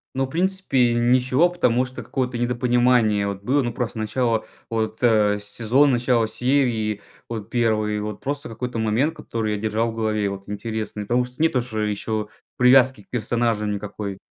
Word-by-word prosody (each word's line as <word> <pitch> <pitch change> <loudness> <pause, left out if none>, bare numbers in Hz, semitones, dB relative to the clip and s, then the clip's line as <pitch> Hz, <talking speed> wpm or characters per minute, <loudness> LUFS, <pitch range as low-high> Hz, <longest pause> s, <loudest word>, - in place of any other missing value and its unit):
Ну 135 0 +1
в - - -15
принципе 165 -8 +1
ничего, 125 +7 +3
потому 125 -8 +1
что 130 0 -7
какое-то 125 -2 -3
недопонимание 120 -3 +2
вот 100 0 -5
было. 140 +5 +2
Ну 120 -1 -3
просто 120 -2 -3
начало 115 0 0 0.2
вот, 110 -1 -2
э, 105 -3 +3
сезона 120 +7 +2
начало 120 -1 +2
серии 120 -6 0 0.3
вот 110 -2 -6
1 110 -3 +1
вот 105 0 -5
просто 145 +1 -3
какой-то 115 +1 -5
момент 115 +9 +1
который 110 -7 -3
я - - -4
держал 110 +2 0
в - - -10
голове 110 -2 -1
и - - +1
вот 100 0 -7
интересный. 105 0 -4
Потому 120 +4 +1
что 125 +4 -10
нет 160 - +3
уже, 110 -3 -2
еще 105 +1 -3 0.3
привязки 125 -3 +5
к - - -36
персонажам 115 -2 0
никакой. 100 -1 -5
115 Hz, 170 wpm, -23 LUFS, 105-125 Hz, 0.3 s, привязки